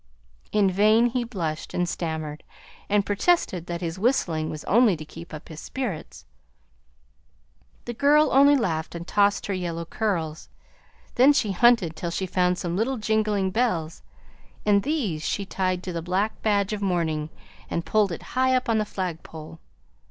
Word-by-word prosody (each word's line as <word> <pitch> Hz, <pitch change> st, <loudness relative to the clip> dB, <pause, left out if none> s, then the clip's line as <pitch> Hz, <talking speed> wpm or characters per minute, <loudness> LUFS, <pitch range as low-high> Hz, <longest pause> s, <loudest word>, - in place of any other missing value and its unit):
In 205 Hz, -3 st, +3 dB
vain 215 Hz, +5 st, +4 dB
he 250 Hz, 0 st, 0 dB
blushed 170 Hz, -10 st, -4 dB
and 180 Hz, 0 st, +1 dB
stammered, 160 Hz, -3 st, -4 dB, 0.5 s
and 205 Hz, -1 st, +2 dB
protested 205 Hz, -, +1 dB
that 170 Hz, 0 st, -4 dB
his 170 Hz, +1 st, -4 dB
whistling 175 Hz, -9 st, +1 dB
was 155 Hz, -, -6 dB
only 220 Hz, -4 st, +4 dB
to 155 Hz, -, -8 dB
keep 165 Hz, +2 st, -11 dB
up 155 Hz, +1 st, -9 dB
his 160 Hz, -2 st, -9 dB
spirits. 155 Hz, -, -5 dB, 1.6 s
The 240 Hz, -, -4 dB
girl 295 Hz, +5 st, +4 dB
only 280 Hz, +2 st, +6 dB
laughed 165 Hz, -, -1 dB
and 170 Hz, 0 st, -6 dB
tossed 205 Hz, 0 st, +2 dB
her 200 Hz, -, -2 dB
yellow 170 Hz, -2 st, -3 dB
curls; 165 Hz, -5 st, -3 dB, 0.6 s
then 265 Hz, +4 st, +6 dB
she 215 Hz, -7 st, +1 dB
hunted 195 Hz, -5 st, +4 dB
till 170 Hz, -, -4 dB
she 190 Hz, +3 st, -2 dB
found 180 Hz, 0 st, +1 dB
some 175 Hz, -1 st, -3 dB
little 240 Hz, +6 st, 0 dB
jingling 215 Hz, -3 st, 0 dB
bells, 180 Hz, -8 st, -1 dB, 0.6 s
and 205 Hz, -1 st, +4 dB
these 220 Hz, -, -1 dB
she 200 Hz, +5 st, -2 dB
tied 185 Hz, -1 st, -1 dB
to 180 Hz, -, -5 dB
the 165 Hz, -, -3 dB
black 185 Hz, +5 st, -1 dB
badge 205 Hz, -1 st, +1 dB
of 210 Hz, -, -4 dB
mourning 165 Hz, -5 st, -1 dB, 0.4 s
and 170 Hz, -, -2 dB
pulled 210 Hz, -3 st, +2 dB
it 170 Hz, -, -6 dB
high 260 Hz, 0 st, +3 dB
up 255 Hz, -, 0 dB
on 225 Hz, -1 st, +3 dB
the 215 Hz, -, 0 dB
flagpole. 165 Hz, -4 st, -6 dB
190 Hz, 165 wpm, -25 LUFS, 165-220 Hz, 1.6 s, only